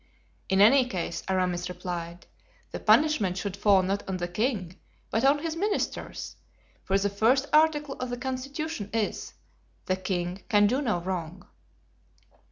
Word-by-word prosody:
"In 190 0 +3
any 250 +4 +6
case," 175 -5 -3
Aramis 180 -2 0
replied, 175 -1 -6 0.5
"the - - -5
punishment 235 -13 +3
should 190 +1 -3
fall 200 -1 +4
not 195 +2 -1
on 190 - -1
the 175 -1 -3
king, 195 -2 -2 0.3
but 225 - 0
on 275 +2 +5
his 325 -1 -2
ministers; 410 +5 -3 0.5
for 195 - +1
the 200 +1 +1
first 225 +7 +2
article 300 -2 +3
of 255 - -3
the 245 - -3
constitution 265 -1 -4
is, 225 -2 -2 0.5
'The 185 - 0
king 185 0 -3
can 205 -1 +5
do 255 +7 +1
no 215 -10 0
wrong. 180 0 -5
200 Hz, 150 wpm, -27 LUFS, 185-260 Hz, 0.5 s, any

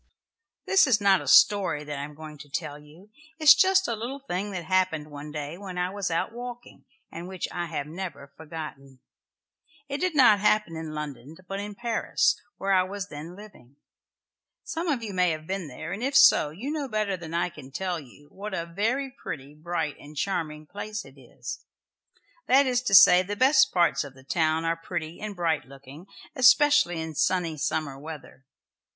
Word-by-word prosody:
This 385 -5 +5
is 235 -5 +3
not 195 -2 +4
a - - -9
story 190 -7 +5
that 145 -1 -5
I - - -4
am 150 +1 -9
going 155 -1 -10
to 145 - -12
tell 150 -2 -4
you. 160 +8 -18 0.3
It 320 - -8
is 300 - +11
just 385 0 +3
a 235 - -1
little 240 +5 -5
thing 205 -7 -4
that 180 -4 -5
happened 170 -5 0
one 145 +1 -8
day 150 +3 -6
when 190 -3 -7
I 180 +1 -1
was 200 -1 -3
out 165 +5 -1
walking, 245 0 -9 0.3
and 170 +2 -7
which 185 -1 -4
I 175 -1 -3
have 155 -3 -4
never 150 -4 -7
forgotten. 150 -4 -9 0.9
It 280 0 -4
did 365 -2 -1
not 240 -7 +6
happen 210 -4 +2
in 160 -1 -6
London, 150 0 -7
but 195 0 -4
in 205 0 -6
Paris, 235 0 +1 0.2
where 195 0 0
I 185 - +5
was 195 +2 -5
then 155 +4 -8
living. 195 - -15 0.9
Some 330 +2 -4
of 270 -7 0
you 210 -3 -5
may 180 -1 +3
have 155 -1 -4
been 190 -1 -4
there, 155 +5 -7
and 200 +4 -5
if 275 +2 -1
so 270 - +6
you 210 - -6
know 300 -3 -3
better 215 -4 -1
than 165 -2 -7
I 175 +1 +1
can 135 -4 -12
tell 180 +4 -3
you 145 +1 -16
what 200 0 -6
a 170 - -3
very 225 +11 -1
pretty, 145 - -8
bright 155 -1 -3
and 150 +1 -13
charming 155 -4 -2
place 205 +4 -6
it - - -16
is. - - -9 0.8
That 275 +2 +5
is 250 -1 +1
to 195 - +4
say, 180 -1 +9
the 200 +3 -4
best 270 +3 +5
parts 175 -3 +2
of 140 -2 -11
the 130 - -16
town 160 +2 0
are 165 0 +1
pretty 165 -1 -6
and 210 -1 -5
bright 165 -4 0
looking, 140 +5 -13 0.3
especially 270 - +5
in 160 0 -5
sunny 175 +1 0
summer 145 -1 -2
weather. 150 -3 -10
180 Hz, 195 wpm, -26 LUFS, 155-210 Hz, 0.9 s, is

